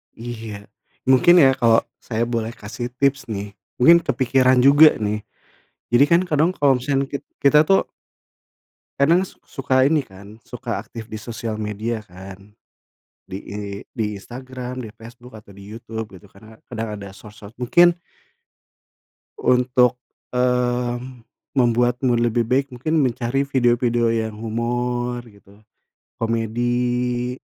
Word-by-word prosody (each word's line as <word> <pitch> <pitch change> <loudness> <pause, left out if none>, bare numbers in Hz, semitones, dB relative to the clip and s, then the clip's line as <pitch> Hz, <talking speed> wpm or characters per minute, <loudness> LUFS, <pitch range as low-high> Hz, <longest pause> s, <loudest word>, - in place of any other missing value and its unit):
Iya, 110 -3 -8 0.4
mungkin 130 +7 +6
ya, 135 - +6
kalo, 115 -1 +4 0.2
saya 115 0 -2
boleh 115 -1 -2
kasih 115 +4 -6
tips 140 0 0
nih, 100 -2 -5 0.3
mungkin 170 +7 +8
kepikiran 130 -2 +2
juga 145 +3 +7
nih. 105 0 -2 0.7
Jadi 120 +4 +6
kan 170 +2 +5
kadang 155 +3 +3
kalo 140 -3 +3
misalkan 135 +1 -1
kit-kita 140 +1 +1
tuh 195 - +3 1.1
kadang 165 +6 +4
su 190 - -7
suka 130 -2 +1
ini 155 +1 +3
kan, 100 -1 -15
suka - - -5
aktif 115 -1 -10
di 110 -1 -8
sosial 115 0 -5
media 110 +2 -3
kan, 95 0 -13 0.7
di 95 0 -7
I 100 - -9 0.4
di 105 -3 -3
Instagram, 125 +2 -8
di 110 - -8
Facebook, 115 +3 -14
atau 100 -2 -17
di 100 - -13
YouTube 110 -4 -7
gitu, 100 - -18
karena 110 +3 -17
kadang 110 -3 -5
ada 100 -1 -10
sosok 105 +1 -14
mungkin 175 +8 +4 1.4
untuk, 125 -1 +2 0.3
eee, 125 -1 0 0.6
membuatmu 120 0 +2
lebih 120 0 +1
baik, 135 +2 0
mungkin 155 +6 -1
mencari 130 +1 0
video-video 120 -3 +1
yang 110 -1 -2
humor 120 +2 -2
gitu, 100 0 -21 0.6
komedi 120 +2 -1
120 Hz, 125 wpm, -21 LUFS, 110-130 Hz, 1.4 s, mungkin